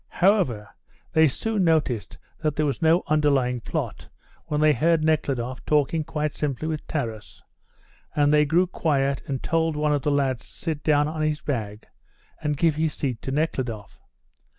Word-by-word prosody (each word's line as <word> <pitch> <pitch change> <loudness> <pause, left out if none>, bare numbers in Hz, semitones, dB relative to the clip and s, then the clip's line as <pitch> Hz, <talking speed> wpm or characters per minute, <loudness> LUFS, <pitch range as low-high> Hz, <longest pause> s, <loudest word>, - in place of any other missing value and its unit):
However, 175 - +2 0.5
they 160 0 +6
soon 210 - -1
noticed 145 - 0 0.2
that 155 -2 0
there 155 - +1
was 140 +3 -2
no 165 +2 +4
underlying 140 -5 +2
plot - - -4 0.4
when 150 - -1
they 155 0 +5
heard 165 +1 +2
Nekhludoff 135 -5 -1
talking 150 +2 +1
quite 150 -1 -2
simply 150 0 -3
with 155 -2 -4
Taras, 115 -8 -5 0.7
and 145 0 +3
they 150 0 +5
grew 165 +5 +3
quiet 140 -6 0
and 135 -2 -3
told 165 -1 +1
one 150 0 +1
of 145 - 0
the 150 - 0
lads 135 -4 0
to - - -16
sit 155 -3 -4
down 150 -1 +3
on 155 0 -4
his 155 0 0
bag 110 -7 -4 0.6
and 150 -1 -1
give 160 -1 +2
his 160 -1 0
seat 125 -6 -3
to - - -5
Nekhludoff. 130 -8 -3
150 Hz, 170 wpm, -24 LUFS, 135-160 Hz, 0.7 s, they